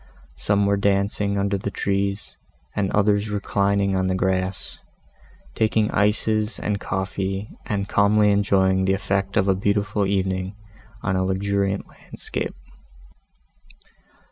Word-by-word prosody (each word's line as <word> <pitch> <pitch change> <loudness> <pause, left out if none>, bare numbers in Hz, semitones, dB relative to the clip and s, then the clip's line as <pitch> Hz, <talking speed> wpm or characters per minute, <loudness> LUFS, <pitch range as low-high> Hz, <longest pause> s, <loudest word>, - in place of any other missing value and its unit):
Some 100 - +2
were 100 0 +2
dancing 100 0 +1
under 100 0 0
the 100 - -3
trees, 100 0 -2 0.4
and 100 -2 0
others 105 0 +2
reclining 100 -1 +1
on 95 0 +1
the 95 - +1
grass, 95 0 -1 0.7
taking 110 -1 +1
ices 105 +1 +1
and 105 -1 -2
coffee 95 +1 -3 0.2
and 100 -2 -1
calmly 105 +1 +4
enjoying 95 -2 +3
the 95 - +3
effect 100 0 -1
of 100 -2 +3
a 95 - +4
beautiful 100 +1 0
evening, 95 0 -1 0.5
on 95 - 0
a 95 - +1
luxuriant 100 +1 0
landscape. - - -6
100 Hz, 120 wpm, -23 LUFS, 95-100 Hz, 0.7 s, calmly